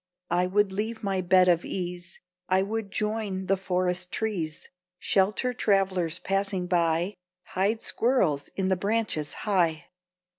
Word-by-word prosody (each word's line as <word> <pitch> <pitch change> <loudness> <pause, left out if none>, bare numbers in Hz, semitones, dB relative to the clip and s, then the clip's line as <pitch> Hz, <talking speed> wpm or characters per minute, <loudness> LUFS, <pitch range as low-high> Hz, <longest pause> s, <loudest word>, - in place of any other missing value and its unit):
I 180 +1 +2
would 200 +1 +2
leave 220 +3 -3
my 195 -2 0
bed 185 +1 +5
of 175 -1 +3
ease, 175 -1 -5 0.3
I 190 +1 +3
would 215 0 -3
join 210 -2 -2
the 195 - +2
forest 180 -1 -1
trees; 175 -9 -3 0.3
Shelter 205 +8 +1
travelers 190 -7 +1
passing 195 -1 -1
by, 170 +1 +1 0.4
Hide 205 +4 0
squirrels 190 - +1
in 190 -1 0
the 190 - +3
branches 200 -6 -1
high. 170 -7 +1
190 Hz, 135 wpm, -27 LUFS, 180-205 Hz, 0.4 s, bed